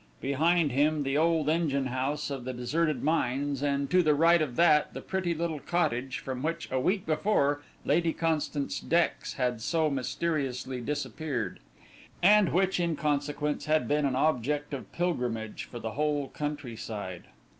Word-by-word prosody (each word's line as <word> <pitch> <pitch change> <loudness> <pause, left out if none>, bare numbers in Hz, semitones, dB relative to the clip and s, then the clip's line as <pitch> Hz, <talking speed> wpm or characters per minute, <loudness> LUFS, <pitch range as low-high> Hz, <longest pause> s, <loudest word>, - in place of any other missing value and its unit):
Behind 155 +3 +2
him 150 +3 +2
the 135 0 -1
old 160 -1 +2
engine 150 -4 +1
house 135 +4 -2
of 135 -3 -4
the 130 +1 -4
deserted 145 +4 -1
mines, 140 -2 0
and 140 -1 0
to 180 0 +5
the 155 -3 +3
right 165 +2 +5
of 135 -6 -2
that 155 -3 +4
the - - -3
pretty 185 -3 -1
little 160 -2 -2
cottage 135 -6 -1
from 130 -1 -5
which 165 +3 -2
a 130 - +1
week 185 +8 0
before 150 -3 +1 0.2
Lady 170 -1 +2
Constance 155 -3 -1
Dex 170 +1 0
had 125 -3 -1
so 160 +4 +1
mysteriously 130 -2 -2
disappeared, 145 -1 -3 0.6
and 205 0 +6
which 190 +1 +2
in 170 -2 +1
consequence 145 0 -1
had 155 0 +2
been 145 0 +2
an 130 - -1
object 145 +1 0
of 135 - -6
pilgrimage 125 -11 -2
for 120 - -9
the 115 -1 -4
whole 145 +1 -1
countryside. 115 - -5
145 Hz, 155 wpm, -29 LUFS, 130-165 Hz, 0.6 s, and